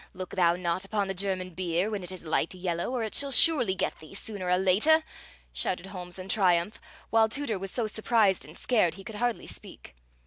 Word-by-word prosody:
Look 185 -1 -7
thou 175 -2 +3
not 175 +1 -2
upon 200 0 -1
the 195 - -2
German 185 -1 -2
beer 180 +3 -1
when 205 -2 -3
it 180 - -6
is 185 -2 -9
light 160 +2 0
yellow, 175 0 -2
or 250 -2 -2
it 220 - -4
shall 280 - +2
surely 250 - +5
get - - -2
thee, 155 +4 -11
sooner 200 -3 -2
or 180 - +4
later!" 210 - +4 0.5
shouted 170 - -2
Holmes 180 -2 -6
in 185 0 -8
triumph, 185 -1 +2 0.3
while 225 -1 +4
Tooter 230 -5 -1
was 195 +1 -4
so 235 +3 -1
surprised 215 -2 +2
and - - -11
scared 195 -10 +1
he 195 - -11
could 215 +1 -8
hardly 240 +1 -1
speak. - - -8
190 Hz, 210 wpm, -28 LUFS, 180-220 Hz, 0.5 s, surely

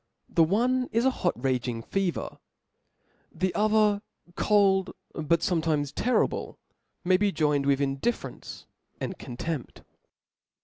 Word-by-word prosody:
The 165 - +4
one 250 +9 +1
is 230 +2 +1
a 265 - +5
hot 180 -8 0
raging 125 -3 -1
fever 195 +2 -2 0.9
5 - - -18
the 185 0 +1
other, 210 -1 +3 0.3
cold^ 195 -1 +3 0.2
but 160 +1 +1
fometimes 155 -5 0
terrible, 250 +1 0 0.5
may 185 +1 +5
be 205 +1 +2
joined 150 -5 +1
with 140 -1 +3
indifference 135 - -3 0.3
and - - -4
contempt. 130 +3 -5
175 Hz, 120 wpm, -27 LUFS, 145-210 Hz, 0.9 s, a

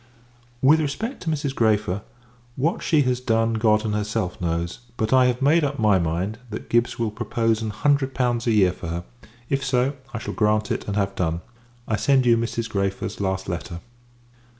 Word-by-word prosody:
With 155 +4 +6
respect 205 - -3
to 170 - -3
Mrs. 145 -3 -1
Græfer 105 -5 +1 0.5
what 155 +7 0
she 155 -4 +3
has 125 -1 0
done, 115 -2 +1
God 110 -1 +2
and 105 - -1
herself 105 -3 -2
knows; 85 0 -2 0.2
but 110 +3 0
I 130 -1 +6
have 125 +1 0
made 155 +4 +4
up 140 0 -1
my 105 -4 +4
mind, 90 +6 -2
that 105 - -7
Gibbs 120 +1 +2
will 115 -2 -1
propose 115 0 0
an 110 - -2
hundred 135 +4 +1
pounds 120 -2 0
a - - +4
year 100 -4 +4
for - - -8
her: 85 +1 -3 0.4
if 135 +1 -1
so, 130 +1 +1 0.2
I 120 - -4
shall 110 - -5
grant 105 0 +1
it, - - -3
and 100 - -2
have 100 -1 0
done. 85 -3 -1 0.5
I 110 - 0
send 130 +4 +3
you 120 -1 +6
Mrs. 115 0 -2
Græfer's 100 -2 -2
last 95 -1 -1
letter. 85 -1 -4
115 Hz, 195 wpm, -23 LUFS, 100-130 Hz, 0.5 s, With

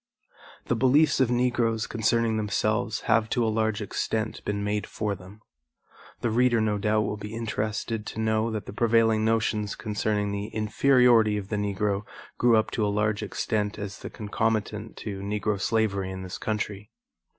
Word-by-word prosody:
The - - +1
beliefs 140 +5 +4
of 130 -3 +3
Negroes 120 -2 +1
concerning 115 0 +1
themselves 110 0 0
have 110 -1 +2
to 120 - +1
a 110 - 0
large 110 -1 0
extent 110 +1 -2
been 100 0 -2
made 105 0 -1
for 105 -2 -2
them. 100 +3 -12 0.8
The 120 - 0
reader 120 0 +3
no 105 -1 +1
doubt 105 +1 +2
will 105 - -3
be 105 +1 -7
interested 110 -1 -3
to - - -6
know 110 0 +1
that 110 -3 -4
the - - -8
prevailing 115 -1 +3
notions 110 -2 0
concerning 105 -1 -1
the 100 +1 -3
inferiority 110 0 +4
of 100 -1 -6
the 105 - -1
Negro 100 0 0 0.4
grew 120 -2 +5
up 110 - +1
to 110 - -1
a - - +2
large 105 +1 0
extent 105 0 -2
as 105 -1 -6
the - - -7
concomitant 110 0 -2
to 100 -3 -5
Negro 100 0 -1
slavery 100 -3 0
in 95 0 -6
this 95 0 -6
country. 105 -1 -3
110 Hz, 170 wpm, -26 LUFS, 105-115 Hz, 0.8 s, grew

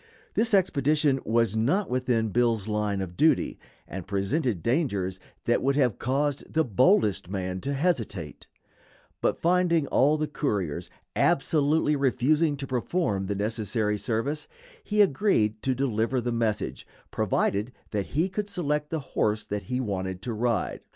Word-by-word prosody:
This 225 -1 +3
expedition 150 -5 +2
was 115 -1 +2
not 140 - +1
within 125 -3 0
Bill's 115 -2 +1
line 105 -2 -1
of 90 -2 -6
duty, 160 - +2 0.3
and 95 -1 -7
presented 100 - -1
dangers 100 - 0 0.3
that - - +2
would 135 +1 +1
have 130 -7 +2
caused 140 +2 -1
the 160 - +2
boldest 110 - +2
man 95 -1 -3
to 140 +1 -2
hesitate; 115 - -2 0.7
but - - +1
finding 170 -2 +2
all 150 +3 +3
the 155 - 0
couriers 105 - -2 0.3
absolutely 150 +1 +2
refusing 145 +3 +2
to 140 - -4
perform 125 - -1
the 100 - -1
necessary 105 0 -1
service, 135 +9 -2 0.4
he 210 0 +4
agreed 130 - +1
to 130 -1 0
deliver 125 -1 0
the 120 0 -2
message, 115 -3 -2 0.2
provided 105 +5 0 0.2
that 100 -3 -2
he 160 +6 0
could 200 +2 -4
select 150 -5 -1
the 160 - -2
horse 105 0 +1
that 105 0 -4
he 125 0 0
wanted 95 -5 -3
to 120 - -3
ride. 115 +1 -1
125 Hz, 145 wpm, -27 LUFS, 105-150 Hz, 0.7 s, he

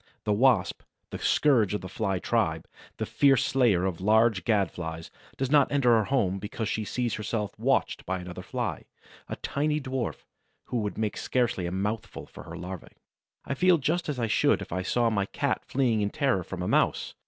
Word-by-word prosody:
The 105 - +1
Wasp, 125 +3 +3 0.3
the - - -5
scourge 115 -9 +3
of 105 - -3
the 95 - -6
Fly 95 0 -1
tribe, 90 - 0 0.3
the - - -2
fierce 135 -2 +3
slayer 115 -9 +3
of 90 -2 -3
large 110 -2 +3
Gad 105 -4 +2
flies, 80 -1 -6 0.3
does 135 0 -2
not 145 -2 +4
enter 130 -5 +4
her 110 -2 +2
home 100 -8 0
because 105 +2 -4
she 110 - -2
sees 120 +2 -2
herself 105 -1 -2
watched - - +1
by 95 +1 -1
another 90 -1 -7
Fly, - - -4 0.4
a - - -3
tiny 150 +2 -1
dwarf, 130 -3 -4 0.4
who 125 - -3
would 105 -3 -2
make 110 -1 -2
scarcely 120 -8 0
a - - -4
mouthful 105 +4 -3
for - - -12
her 85 - -8
larvæ. 90 +1 -8 0.5
I 140 - -2
feel 180 +5 +4
just 160 +3 -1
as 145 - -2
I 120 - 0
should 110 - +2
if - - -8
I 95 +2 -1
saw 115 +5 +1
my 100 -2 0
Cat - - -1
fleeing 125 -5 +1
in 100 - 0
terror 130 - 0
from 90 +1 -6
a - - -2
Mouse. - - +1
110 Hz, 200 wpm, -27 LUFS, 95-130 Hz, 0.5 s, not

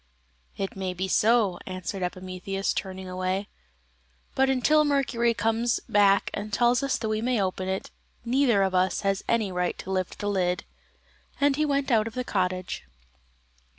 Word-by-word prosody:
"It 195 - -3
may 190 -1 -3
be 190 +2 -2
so," 210 -2 +3
answered 185 +1 -5
Epimetheus, 185 +2 -3
turning 190 -1 -5
away; 185 +2 -2 0.8
"but 265 0 +3
until 300 +4 +4
Mercury 255 -5 +1
comes 225 +2 +1
back 200 -1 +4
and 210 +1 -4
tells 240 +4 +3
us 275 -1 0
that 220 - -3
we 215 0 -1
may 245 -1 +1
open 185 -1 -1
it, 190 0 -3 0.3
neither 240 -4 +3
of 190 -1 0
us 185 0 +2
has 195 -1 0
any 220 -4 +1
right 180 -1 -1
to 190 - -7
lift 185 -2 -2
the 205 - -4
lid;" 180 -3 0 0.8
and 285 0 +3
he 305 +1 +1
went 280 -1 0
out 220 -2 +3
of 230 - -8
the 250 - -1
cottage. 185 -4 -2
200 Hz, 165 wpm, -26 LUFS, 185-240 Hz, 0.8 s, until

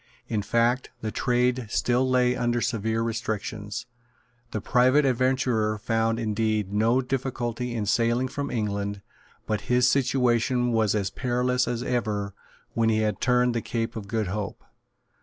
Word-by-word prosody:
In 110 -2 -1
fact, 115 +5 +1
the 110 - -3
trade 125 0 +1
still 125 +3 +1
lay 125 -1 +3
under 120 -1 0
severe 115 -1 -1
restrictions. 110 -3 -3 0.6
The 110 - -3
private 130 +7 +3
adventurer 125 -4 +1
found 115 +1 0
indeed 110 -2 -1
no 115 +5 +3
difficulty 125 -2 -3
in 110 -2 -1
sailing 115 +4 +2
from 140 +2 -4
England; 100 -3 -2 0.4
but 105 -1 -1
his 125 0 +4
situation 125 -2 +2
was 110 -3 +2
as 100 -2 -1
perilous 125 0 0
as 120 0 -2
ever 105 -5 -1 0.4
when 115 -1 +2
he 110 - +2
had 105 -3 -1
turned 125 -1 +3
the 115 - -1
Cape 115 +1 -3
of 105 -3 -6
Good 110 0 -1
Hope. 105 +1 -4
115 Hz, 145 wpm, -26 LUFS, 110-125 Hz, 0.6 s, his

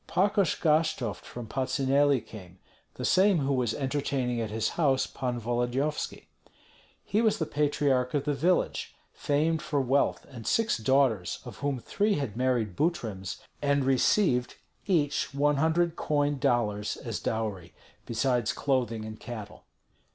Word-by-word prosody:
Pakosh 200 -1 +2
Gashtovt 150 -8 +1
from 120 -1 -7
Patsuneli 135 +2 +2
came, 90 -4 -12 0.4
the - - -4
same 190 0 +4
who 140 -2 0
was 125 -4 0
entertaining 135 -3 -1
at 110 - -3
his 110 +1 -1
house 135 -5 +2
Pan 125 -2 -3
Volodyovski. 120 +6 -2 0.8
He 210 - +1
was 220 -2 +2
the 160 - -1
patriarch 145 -3 +1
of 140 - +1
the 150 - +1
village, 170 +7 0 0.2
famed 155 +2 0
for 145 - -1
wealth 135 +1 +1
and 115 -4 -9
six 225 - +2
daughters, 115 -6 +2
of - - -9
whom 140 -2 -2
three 205 - 0
had 135 -8 -3
married 120 -6 0
Butryms, 110 - -2 0.2
and 140 -1 +2
received 130 0 +2 0.3
each 150 -6 +1
one 145 +1 +2
hundred 160 +3 +2
coined 145 -1 0
dollars 105 -5 0
as - - -5
dowry, 100 -7 -3 0.3
besides 120 0 +1
clothing 120 -5 -1
and 110 0 -8
cattle. 110 -3 -8
135 Hz, 140 wpm, -28 LUFS, 115-150 Hz, 0.8 s, same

